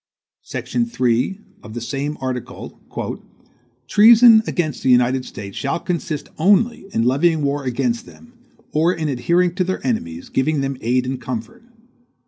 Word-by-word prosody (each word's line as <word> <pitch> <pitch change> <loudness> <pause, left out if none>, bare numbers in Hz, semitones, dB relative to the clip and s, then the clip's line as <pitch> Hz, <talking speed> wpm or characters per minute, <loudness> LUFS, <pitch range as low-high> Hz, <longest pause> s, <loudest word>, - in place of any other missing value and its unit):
Section 235 -1 -3
3, 130 - 0 0.2
of 110 +1 -11
the - - -3
same 140 +5 -4
article 130 -2 -6 1.1
"Treason 225 - +7
against 155 -7 -2
the - - 0
United 125 +1 +3
States 100 -1 -9
shall 140 +4 -2
consist 165 -4 -3
only 205 +5 +2
in 115 - 0
levying 150 +5 +2
war 140 0 -1
against 235 - -1
them, 240 0 -16 0.4
or 160 +3 +2
in 160 -3 -2
adhering 170 +7 +1
to 185 0 0
their 185 +1 -3
enemies, 255 +2 -3
giving 145 +2 0
them 135 0 -2
aid 125 +2 +1
and 130 0 -4
comfort. 230 - -6
155 Hz, 145 wpm, -20 LUFS, 130-210 Hz, 1.1 s, Treason